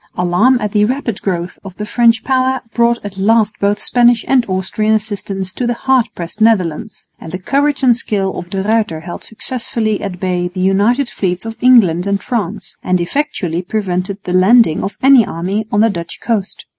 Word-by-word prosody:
Alarm 180 Hz, +9 st, +3 dB
at 210 Hz, -3 st, -3 dB
the 210 Hz, 0 st, +2 dB
rapid 235 Hz, -2 st, -2 dB
growth 175 Hz, -2 st, -3 dB
of 190 Hz, -3 st, -10 dB
the 210 Hz, -, -4 dB
French 230 Hz, 0 st, +2 dB
power 260 Hz, -1 st, +1 dB
brought 235 Hz, 0 st, +2 dB
at 195 Hz, -1 st, -7 dB
last 215 Hz, +1 st, +2 dB
both 205 Hz, +1 st, +1 dB
Spanish 240 Hz, +1 st, +2 dB
and 255 Hz, -3 st, +2 dB
Austrian 195 Hz, +4 st, 0 dB
assistance 200 Hz, -3 st, -4 dB
to 245 Hz, -, -2 dB
the 240 Hz, -, 0 dB
hard 260 Hz, -1 st, +2 dB
pressed 175 Hz, +5 st, -7 dB
Netherlands; 210 Hz, -2 st, 0 dB
and 160 Hz, -, -9 dB
the 185 Hz, -, -3 dB
courage 280 Hz, +8 st, 0 dB
and 245 Hz, -2 st, +5 dB
skill 195 Hz, -4 st, -2 dB
of 175 Hz, -, -7 dB
De 190 Hz, +1 st, -3 dB
Ruyter 215 Hz, -6 st, 0 dB
held 175 Hz, +1 st, -8 dB
successfully 225 Hz, -2 st, -3 dB
at 185 Hz, -3 st, -5 dB
bay 180 Hz, -1 st, -1 dB
the 180 Hz, +1 st, -8 dB
united 205 Hz, +8 st, +2 dB
fleets 190 Hz, -3 st, -3 dB
of 225 Hz, 0 st, -5 dB
England 200 Hz, -9 st, +4 dB
and 200 Hz, 0 st, -1 dB
France, 215 Hz, -5 st, -4 dB
and 185 Hz, 0 st, 0 dB
effectually 180 Hz, -, -2 dB
prevented 190 Hz, -1 st, -3 dB
the 180 Hz, -, -4 dB
landing 190 Hz, -1 st, +4 dB
of 195 Hz, -, -5 dB
an 270 Hz, -3 st, +7 dB
army 195 Hz, +4 st, -3 dB
on 205 Hz, -, +2 dB
the 225 Hz, -, +4 dB
Dutch 170 Hz, -3 st, -7 dB
coast. 215 Hz, -4 st, -3 dB
210 Hz, 190 wpm, -15 LUFS, 185-235 Hz, -, an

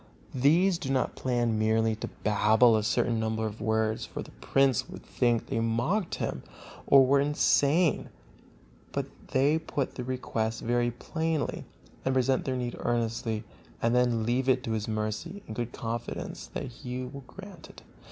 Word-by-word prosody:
These 165 Hz, +8 st, +3 dB
do 145 Hz, -7 st, -4 dB
not 130 Hz, -2 st, +1 dB
plan 120 Hz, -3 st, 0 dB
merely 110 Hz, 0 st, +2 dB
to -, -, -4 dB, 0.2 s
babble 110 Hz, +3 st, +5 dB
a 110 Hz, -, +2 dB
certain 110 Hz, +2 st, +1 dB
number 110 Hz, 0 st, -1 dB
of 110 Hz, +1 st, -5 dB
words, 110 Hz, +1 st, 0 dB
for -, -, -6 dB
the -, -, -13 dB
prince 135 Hz, -3 st, +1 dB
would -, -, -9 dB
think 120 Hz, -2 st, +1 dB
they -, -, -2 dB
mocked 120 Hz, -, 0 dB
him, -, -, -3 dB, 0.5 s
or 135 Hz, -1 st, +7 dB
were 140 Hz, +2 st, +4 dB
insane; 150 Hz, +3 st, +2 dB, 0.8 s
but -, -, -1 dB, 0.2 s
they 140 Hz, +4 st, +2 dB
put 145 Hz, -3 st, -3 dB
their 125 Hz, -, -5 dB
request 115 Hz, -3 st, -2 dB
very 120 Hz, 0 st, +1 dB
plainly, 160 Hz, +5 st, -2 dB, 0.4 s
and 130 Hz, 0 st, 0 dB
present 130 Hz, 0 st, +2 dB
their 130 Hz, -1 st, -1 dB
need 120 Hz, -1 st, -3 dB
earnestly, 115 Hz, -2 st, -1 dB, 0.4 s
and 115 Hz, +1 st, +1 dB
then 120 Hz, -3 st, +2 dB
leave 125 Hz, +3 st, +1 dB
it 130 Hz, -1 st, +3 dB
to 115 Hz, -, -3 dB
his 110 Hz, -1 st, -2 dB
mercy, 110 Hz, -, -3 dB
in 110 Hz, -, -6 dB
good 120 Hz, +1 st, -3 dB
confidence 115 Hz, 0 st, -5 dB
that -, -, -5 dB
he 125 Hz, +1 st, -6 dB
will 140 Hz, +2 st, -9 dB
grant 195 Hz, -4 st, -11 dB
it. -, -, -14 dB
120 Hz, 165 wpm, -28 LUFS, 110-135 Hz, 0.8 s, or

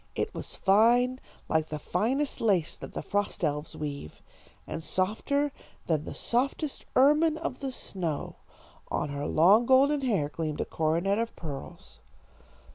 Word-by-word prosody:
It -, -, -2 dB
was -, -, -6 dB
fine, 240 Hz, +6 st, +4 dB, 0.3 s
like 160 Hz, 0 st, +1 dB
the 155 Hz, -, -4 dB
finest 265 Hz, -, -1 dB
lace 190 Hz, -8 st, +2 dB
that -, -, -9 dB
the -, -, -4 dB
frost 205 Hz, -2 st, -2 dB
elves 150 Hz, -1 st, -1 dB
weave, 140 Hz, -, -6 dB, 0.4 s
and -, -, -5 dB
softer 220 Hz, -, 0 dB, 0.3 s
than 155 Hz, -2 st, 0 dB
the -, -, -7 dB
softest 275 Hz, +4 st, -1 dB
ermine 300 Hz, +4 st, +5 dB
of 320 Hz, -6 st, -4 dB
the 270 Hz, -2 st, -3 dB
snow. 170 Hz, -, -4 dB, 0.5 s
On 150 Hz, -, -1 dB
her 145 Hz, +1 st, -3 dB
long 200 Hz, +9 st, +5 dB
golden 275 Hz, +2 st, +5 dB
hair 205 Hz, -, +1 dB
gleamed 155 Hz, 0 st, -4 dB
a -, -, -1 dB
coronet 170 Hz, +6 st, 0 dB
of 230 Hz, 0 st, -2 dB
pearls. 145 Hz, -5 st, -8 dB
200 Hz, 145 wpm, -28 LUFS, 155-260 Hz, 0.5 s, ermine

